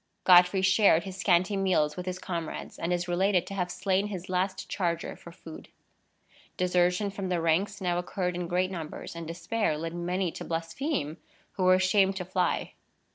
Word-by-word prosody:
Godfrey 180 +1 +6
shared 190 -3 +5
his 190 0 -7
scanty 185 0 +2
meals 180 -6 +1
with 180 0 -6
his 185 0 -2
comrades, 170 -4 -5
and 170 +1 -2
is 175 0 -1
related 180 0 +2
to 195 - -7
have 180 -2 -2
slain 195 +2 0
his 190 -3 -7
last 185 +1 -1
charger 170 -4 -2
for 170 - -13
food. 165 -2 -11 0.9
Desertion 180 +2 +1
from 195 -1 -4
the 180 -1 0
ranks 170 +5 +1
now 175 -2 0
occurred 180 0 -2
in 175 -1 -3
great 185 +2 0
numbers, 165 -2 -7
and 170 -1 -6
despair 170 +1 -1
led 165 +1 -4
many 175 +1 -1
to - - -7
blaspheme 165 - -3 0.3
who 185 - -2
were 185 0 +7
ashamed 190 +1 +3
to 180 -1 -4
fly. 180 -1 -1
180 Hz, 180 wpm, -28 LUFS, 170-190 Hz, 0.9 s, were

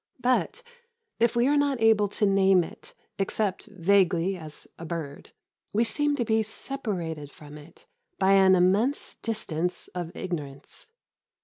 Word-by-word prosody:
But 255 - 0 0.6
if 235 +1 +2
we 240 +1 +3
are 290 - +3
not 285 -3 +1
able 220 -2 +4
to 205 +1 0
name 195 -2 +4
it - - -12 0.2
except 195 0 -1
vaguely 190 -1 +2
as 155 -4 -9
a - - -7
"bird," 160 -4 -6 0.4
we 220 +3 +3
seem 295 +5 0
to 245 -4 -1
be 220 0 +2
separated 185 - -4
from 145 0 -13
it 150 +3 -15 0.3
by 190 - +3
an 190 -1 +6
immense 200 +10 +1
distance 180 -6 -3
of 175 -2 -5
ignorance. 145 - -6
195 Hz, 140 wpm, -27 LUFS, 170-225 Hz, 0.6 s, an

